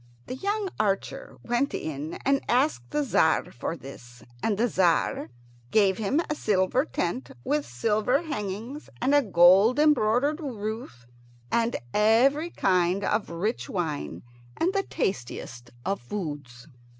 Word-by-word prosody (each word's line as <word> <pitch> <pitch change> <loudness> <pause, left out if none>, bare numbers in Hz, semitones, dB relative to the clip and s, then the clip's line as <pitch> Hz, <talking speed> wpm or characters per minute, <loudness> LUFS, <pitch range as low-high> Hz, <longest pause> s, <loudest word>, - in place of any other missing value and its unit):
The - - -6
young 405 +7 -1
archer 200 -2 -2
went 240 +4 0
in 155 +1 -4
and 275 0 +3
asked 245 - +1
the 295 - 0
Tzar 160 - +2
for 160 +7 -4
this, 125 -3 -12 0.2
and 210 -3 0
the 235 +3 +2
Tzar 180 - +1 0.4
gave 195 0 +3
him 220 +8 +1
a 300 - -1
silver 210 +1 +1
tent 170 - -3
with 150 0 0
silver 215 - +1
hangings 240 - -5
and 265 +3 +1
a 290 - +6
gold 195 +3 +5
embroidered 290 0 +3
roof, 220 - -6 0.5
and 235 0 +1 0.2
every 255 +10 +3
kind 185 - +1
of 210 +1 0
rich 190 +8 -2
wine 145 - -3 0.3
and 360 +3 +1
the 395 - +2
tastiest 120 - -4 0.2
of 195 -6 -1
foods. 145 -6 -6
210 Hz, 135 wpm, -26 LUFS, 165-260 Hz, 0.5 s, a